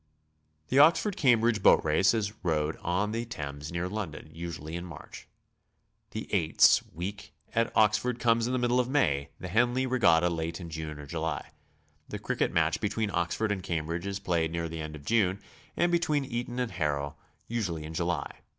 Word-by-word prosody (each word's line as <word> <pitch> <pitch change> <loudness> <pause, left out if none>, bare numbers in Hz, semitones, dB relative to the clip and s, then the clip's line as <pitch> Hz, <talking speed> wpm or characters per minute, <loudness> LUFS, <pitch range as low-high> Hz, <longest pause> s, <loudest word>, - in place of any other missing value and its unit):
• - - -44 0.7
The 135 - +4
Oxford 170 +7 +5
Cambridge 120 -5 +3
boat - - +5
race 80 +8 +3
is 105 -2 -1
rowel 80 -2 +1
on 95 +4 0
the 115 +1 -2
Thames 75 -9 -6
near 85 +1 -2
London, 90 -7 -6
usually 85 -1 -6
in 85 - -4
March. 80 -3 -10 0.8
The - - -6
^'eights'' 80 -1 +5
week 100 +4 -6 0.2
at 115 0 +1
Oxford 110 +3 +3
comes 115 -1 +2
in 125 - -1
the - - +2
middle 125 0 +2
of 125 0 0
May; 70 - +1
the 90 - -6
Henley 120 +6 +2
regatta 90 -10 +3
late 85 0 -3
in 85 -2 -8
June 80 -1 -5
or 75 - -9
July. 80 0 -4 0.6
The - - -4
cricket - - -1
match - - +1
between 105 0 -1
Ox 85 -2 0
ford 110 -1 0
and 100 -2 -2
Cambridge 85 +1 -3
is 100 -1 -2
played 85 -4 0
near 85 0 -2
the 80 0 -5
end 75 0 -6
of 70 -1 -12
June, 100 -4 +2 0.4
and 175 0 +2
be 170 - +4
tween 150 -4 0
Eton 120 0 -4
and 125 -3 -1
Harrow 75 -4 -2 0.3
usually 95 -9 -2
in 80 +1 -7
July. 85 -2 -2
90 Hz, 190 wpm, -29 LUFS, 80-115 Hz, 0.8 s, Oxford